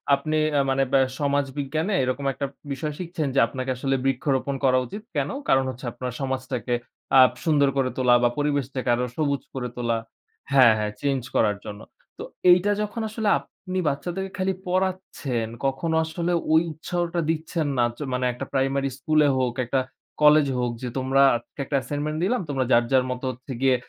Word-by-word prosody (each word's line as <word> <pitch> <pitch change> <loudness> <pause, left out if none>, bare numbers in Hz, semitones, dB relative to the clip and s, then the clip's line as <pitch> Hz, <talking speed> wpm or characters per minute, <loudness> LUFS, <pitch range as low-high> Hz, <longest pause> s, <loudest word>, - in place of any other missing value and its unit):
আপনি 155 +3 -2 0.2
আ - - +4
মানে 135 0 +2
ব্যা 135 - +6 0.2
সমাজবিজ্ঞানে 145 +5 -1
এরকম 130 +2 -2
একটা 140 - -3 0.3
বিষয় 150 +2 -3
শিখছেন, 170 -4 -3
যে 135 - +5
আপনাকে 130 -1 -5
আসলে 135 +1 0
বৃক্ষরোপণ 135 +1 0
করা 130 -1 +4
উচিত। 205 - -8
কেন? - - 0 0.2
কারণ 135 0 +4
হচ্ছে 130 0 -7
আপনার 125 +1 -5
সমাজটাকে 130 -2 -2 0.5
আপ 130 - +7
সুন্দর 145 -3 +4
করে 130 -1 +2
তোলা 125 -1 +4
বা 120 - +5
পরিবেশটাকে 140 -3 -1
আরো 125 - -1
সবুজ 140 -4 0
করে 125 -2 -3
তোলা 120 -1 0 0.5
হ্যাঁ, 130 -4 +7
হ্যাঁ 105 -1 -1
চেঞ্জ 140 -2 0
করার 105 -2 +3
জন্য। 105 0 -7 0.4
তো - - -6 0.3
এইটা 180 +3 +4
যখন 210 +2 -3
আসলে 215 -1 -1
আপনি 185 0 -8
বাচ্চাদের 175 +7 -3
খালি 190 +1 0
পড়াচ্ছেন, 185 -10 -1 0.2
কখনো 150 +5 0
আসলে 170 +2 -2 0.2
ওই 160 - +6
উৎসাহটা 175 +2 -2
দিচ্ছেন 160 0 -1
না। 120 - +4
চ - - -17
মানে 125 0 0
একটা 120 - -6
প্রাইমারি 135 0 +1
স্কুল 155 +3 +1
এ - - +3
হোক, 125 -2 0
একটা 130 +2 +1 0.4
কলেজ 150 -1 +6
হোক 120 -1 0
যে 125 - -2
তোমরা 135 +1 +2
আজকে 120 +4 -8
একটা 145 - -2
অ্যাসাইনমেন্ট 145 +4 -3
দিলাম। 240 +6 +1
তোমরা 135 -3 0
যার, 120 -1 +6
যার 130 -1 +4
মতো 125 +1 -4
হচ্ছে 130 +3 -11
গিয়ে 135 -1 +4
140 Hz, 180 wpm, -24 LUFS, 130-155 Hz, 0.5 s, আপ